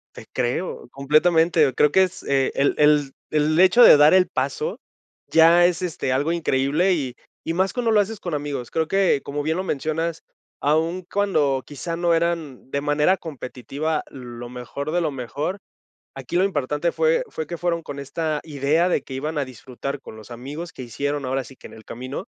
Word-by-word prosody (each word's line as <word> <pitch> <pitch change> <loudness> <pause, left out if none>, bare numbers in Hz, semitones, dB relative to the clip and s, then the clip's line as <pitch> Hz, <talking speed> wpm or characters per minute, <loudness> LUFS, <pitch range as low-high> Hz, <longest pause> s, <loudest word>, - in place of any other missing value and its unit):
Te - - -11
creo, 125 +7 -2
completamente. 155 +2 +3
Creo 150 - +3
que 190 - +5
es 185 -1 -2
el 140 0 +1
el 150 -2 +4 0.2
el 155 +1 +1
hecho 190 +6 +6
de - - +10
dar 150 +3 +6
el 185 -1 +5
paso 135 0 -3 0.5
ya 165 +2 +6
es, 180 +1 -1
este, 155 -7 -2
algo 145 +5 +1
increíble 155 +3 +1
y 130 -6 -3 0.3
y 165 - -2
más 190 +2 +1
cuando 245 -2 0
lo 210 - +5
haces 205 +1 -2
con 175 -4 -4
amigos. 140 -4 -4
Creo 160 -1 -1
que, 195 -8 +2
como 145 +1 -3
bien 160 +3 -1
lo 185 - -1
mencionas, 160 +1 -2 0.4
aun 165 +5 0
cuando 150 -10 +1
quizá 165 +4 -5
no 170 0 +1
eran 165 -6 -2
de 140 - -1
manera 150 +5 +2
competitiva 150 0 -4
lo 120 -2 -9
mejor 125 +4 -6
de 175 - +1
lo 160 -3 0
mejor, 145 +9 -4 0.6
aquí 135 +5 -7
lo 185 - +3
importante 150 -2 0
fue 485 +1 +2
fue 160 - -5
que 170 - -6
fueron 170 -2 -1
con 140 -1 -7
esta 155 +2 -2
idea 155 +3 +1
de 145 - 0
que 135 - -9
iban 150 +4 -3
a 140 - 0
disfrutar 130 +3 -7
con - - -11
los 110 +2 -13
amigos 145 +8 -7
que - - -9
hicieron 140 +4 -3
ahora 130 +1 -1
sí 135 - -14
que - - -12
en - - -15
el 110 - -14
camino, 130 +3 -6
150 Hz, 195 wpm, -23 LUFS, 135-170 Hz, 0.6 s, de